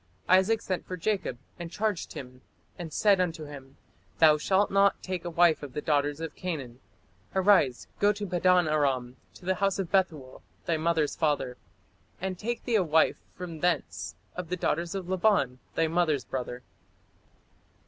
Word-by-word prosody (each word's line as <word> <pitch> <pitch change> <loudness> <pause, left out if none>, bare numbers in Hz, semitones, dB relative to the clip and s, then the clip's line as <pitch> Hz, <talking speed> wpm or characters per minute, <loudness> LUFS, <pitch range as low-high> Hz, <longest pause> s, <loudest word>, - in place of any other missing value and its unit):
" - - -37
Isaac 215 +4 +1
sent 185 -2 -3
for 185 - -5
Jacob, 190 - -1 0.2
"and 170 -1 -5
charged 210 0 -2
him, 125 -1 -9 0.3
and 170 -4 -7
said 200 +2 +4
unto 165 -3 -2
him, 140 -2 -11 0.4
Thou 150 +3 +6
shalt 195 +5 +2
not 195 0 +4
take 185 -2 -4
a - - -2
wife 170 -1 +4
of 140 -3 -8
the - - -2
daughters 145 -1 +1
of 165 -1 -5
Canaan. 135 -9 -5 0.6
Arise, 185 - +4
go 205 0 +5
to 210 0 -4
Padan 180 -1 +3
aram, 135 -5 0 0.2
to - - -14
the 190 - +2
house 195 -1 +2
of 190 -4 -3
Bethuel, 160 -9 0 0.2
thy 165 - +1
mother's 160 -2 +1
father; 145 -5 0 0.6
and 185 0 -4
take 235 +2 -3
thee 240 - -2
a 195 - +3
wife 160 -1 +2
from 170 -3 -7
thence 170 -3 -1 0.2
of 180 -2 -5
the 180 - -1
daughters 170 +1 -1
of 190 -3 -4
Laban, 185 -9 +2 0.2
thy 165 - +2
mother's 160 -4 +1
brother." 125 -1 -5
170 Hz, 170 wpm, -28 LUFS, 145-190 Hz, 0.6 s, Thou